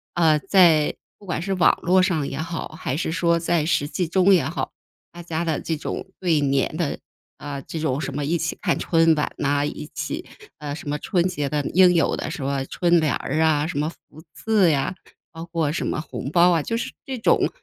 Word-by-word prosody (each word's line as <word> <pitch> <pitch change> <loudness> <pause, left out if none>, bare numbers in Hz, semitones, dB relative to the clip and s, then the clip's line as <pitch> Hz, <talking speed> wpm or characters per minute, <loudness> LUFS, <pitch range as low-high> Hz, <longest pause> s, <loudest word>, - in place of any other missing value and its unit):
呃， 160 -3 +4
在 170 -4 +4 0.2
不 205 - -16
管 175 - -2
是 195 +3 -2
网 180 -2 +3
络 185 +2 +4
上 165 -7 0
也 135 - -5
好， 165 +1 -4
还 135 -3 -2
是 160 - -2
说 170 0 +2
在 165 -1 +1
实 145 -3 +1
际 175 +2 -2
中 190 +3 +4
也 175 - +4
好， 155 +5 -3 0.4
大 175 - -9
家 170 0 -3
的 160 -3 -1
这 160 - -2
种 150 - -5
对 165 -5 +2
年 140 +1 0
的 165 -3 -2 0.4
啊， 140 -1 -6
这 160 - -6
种 145 -3 -1
什 140 -1 -4
么 145 +1 -2
一 170 +4 +1
起 165 0 -3
看 - - +1
春 165 -1 +3
晚 150 - -1
呐， 145 0 +1
一 150 +1 -6
起， - - -4 0.3
呃， 145 -2 -5
什 145 -1 -7
么 150 0 -2
春 175 -4 0
节 150 -6 -1
的 145 0 -1
应 180 0 +6
有 165 - +2
的 - - -4
什 140 - -5
么 135 0 -1
春 175 +3 +2
联 155 -4 +1
儿 145 +4 -2
啊、 155 -2 +3
什 155 -3 -3
么 150 - 0
福 160 -1 -16
字 210 -6 +2
呀， 145 +4 0 0.4
包 165 0 -8
括 165 -3 -1
什 170 - -2
么 - - -2
红 135 - -6
包 175 +1 +5
啊， 165 -3 +2
就 230 - -3
是 230 - -3
这 265 -1 -4
种， 225 - +2
160 Hz, 240 characters per minute, -23 LUFS, 145-175 Hz, 0.4 s, 应